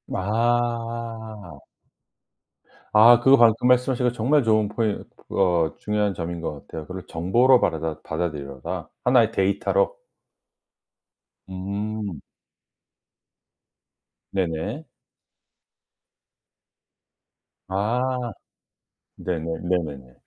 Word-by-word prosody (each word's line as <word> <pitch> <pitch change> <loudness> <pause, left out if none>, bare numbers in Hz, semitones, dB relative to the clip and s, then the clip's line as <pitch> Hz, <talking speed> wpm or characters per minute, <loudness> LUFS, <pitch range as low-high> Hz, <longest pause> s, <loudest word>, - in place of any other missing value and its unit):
아. 115 -3 -2 1.3
아 115 +2 +8
그거 135 +3 +6
방금 115 0 +4
말씀하신 125 0 +3
거 - - +2
정말 130 +5 +2
좋은 110 -2 +3
포인 105 0 -2 0.3
어 85 -4 +1
중요한 105 -1 -1
점인 85 0 -4
것 75 -3 -6
같아요. 80 -2 -7
그리고 90 0 -7
정보로 120 +10 +3
받아라 80 -1 -1
받아들여라. 75 -5 -4
1 125 0 +5
의 110 -1 +1
데이터로. 290 - +1 1.5
음. 100 -1 -4 2.1
네네. 95 - -2 2.9
아. 120 +5 -1 0.8
네네. 85 -3 -3 0.2
네네네. 75 -8 -2
105 Hz, 165 characters per minute, -24 LUFS, 85-120 Hz, 2.9 s, 아